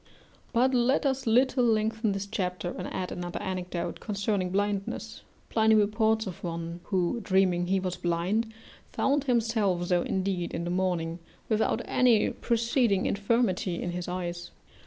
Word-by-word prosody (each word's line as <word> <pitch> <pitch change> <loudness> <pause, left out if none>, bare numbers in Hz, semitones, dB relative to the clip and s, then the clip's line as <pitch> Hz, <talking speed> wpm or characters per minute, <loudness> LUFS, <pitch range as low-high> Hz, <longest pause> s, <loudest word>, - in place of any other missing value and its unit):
But 255 +2 +3
let 255 +4 +2
us 265 -2 0
a - - +4
little 255 +2 +3
lengthen 220 -1 +1
this 195 0 -3
chapter, 180 -4 -3
and 180 - -5
add 185 - -3
another 175 0 -4
anecdote 180 -2 -4
concerning 200 -2 -1
blindness. 200 +1 -2 0.3
Pliny 220 -1 +4
reports 220 +1 +2
of 185 -4 -7
one 170 0 -4
who, 185 +3 0
dreaming 185 -3 +2
he 190 +1 +2
was 185 -1 -3
blind, 180 +7 0 0.4
found 285 +1 +1
himself 220 -7 +1
so 175 -1 +2
indeed 185 -2 -2
in 170 - -2
the 175 - -2
morning 175 -2 -1 0.3
without 220 +1 +1
any 240 -4 +3
preceding 235 -3 +1
infirmity 200 -4 0
in 175 - -3
his 175 0 -4
eyes. 175 -1 -4
195 Hz, 150 wpm, -28 LUFS, 180-225 Hz, 0.4 s, a